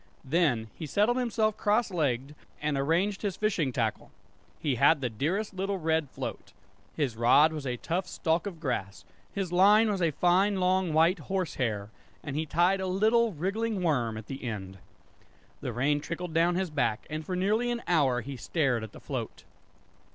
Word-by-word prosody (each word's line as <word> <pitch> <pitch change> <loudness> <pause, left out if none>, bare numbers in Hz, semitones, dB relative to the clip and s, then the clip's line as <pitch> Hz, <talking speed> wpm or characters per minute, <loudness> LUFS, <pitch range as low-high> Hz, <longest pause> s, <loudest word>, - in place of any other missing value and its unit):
Then 130 -8 +1
he 155 - -7
settled 215 - +2
himself 220 -3 0
cross 215 +1 +1
legged 140 -5 -1 0.3
and 150 -1 -1
arranged 170 +9 +1
his 200 -3 -2
fishing 185 -10 0
tackle. 115 -3 -2 0.5
He 145 -4 0
had 145 +6 +4
the 125 -3 -2
dearest 180 - -2
little 195 +1 -2
red 160 -3 0
float. - - -7 0.4
His 140 -7 -1
rod 135 +7 +5
was 150 -3 -5
a 125 -1 -2
tough 175 +8 -2
stalk 165 +4 -1
of 175 -5 -7
grass, 110 - -3 0.3
his 195 -3 -3
line 210 +5 +5
was 195 -2 -2
a 170 - +3
fine 185 +6 +2
long 185 -1 +2
white 165 +4 +3
horse 185 +1 -2
hair, 110 -4 -2 0.3
and 140 - -5
he 155 +1 -2
tied 180 +6 +2
a 190 - -2
little 220 +4 +2
wriggling 200 +5 -2
worm 120 -9 0
at 110 - -8
the 135 +2 -7
end. 95 -5 -5 0.8
The - - -3
rain 140 +5 +1
trickled 170 +1 -5
down 170 +2 +3
his 185 -2 -1
back, 115 -7 0
and 155 +1 -4
for 180 +4 -4
nearly 215 +6 +1
an 240 -1 -2
hour 140 -8 +2
he 135 +3 -7
stared 125 - 0
at 110 - -8
the - - -11
float. - - -5
165 Hz, 180 wpm, -29 LUFS, 135-190 Hz, 0.8 s, rod